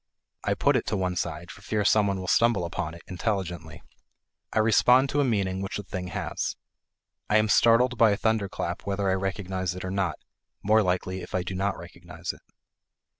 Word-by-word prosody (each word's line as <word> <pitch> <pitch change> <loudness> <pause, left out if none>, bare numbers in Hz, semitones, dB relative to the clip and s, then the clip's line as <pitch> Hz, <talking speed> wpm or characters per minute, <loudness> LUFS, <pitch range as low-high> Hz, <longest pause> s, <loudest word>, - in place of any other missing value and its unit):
I - - +1
put - - +2
it - - 0
to 105 - 0
one 90 -1 -1
side 85 0 -4
for - - -13
fear 105 -2 -1
some 105 +1 +4
one 100 -1 -1
will 95 - -6
stumble 115 -3 +3
upon 85 -1 -4
it, 85 - -13
intelligently; 90 -5 -4 0.7
I - - -4
respond 125 +4 +5
to 145 - +1
a - - +3
meaning 100 -6 0
which 95 - -4
the 105 - -5
thing 90 -1 -5
has. - - -3 0.7
I 105 - +5
am 110 0 +3
startled 120 +3 +4
by 115 - +7
a 100 - +1
thunderclap 100 -5 -2
whether 100 -1 0
I - - +3
recognize 95 -1 -2
it 90 - -6
or 95 - -3
not 95 -6 0 0.5
more 110 +2 +4
likely, 95 0 -1
if - - -7
I 90 - 0
do 90 - -5
not 95 +1 -1
recognize - - -7
it. - - -17
95 Hz, 200 wpm, -26 LUFS, 90-110 Hz, 0.7 s, by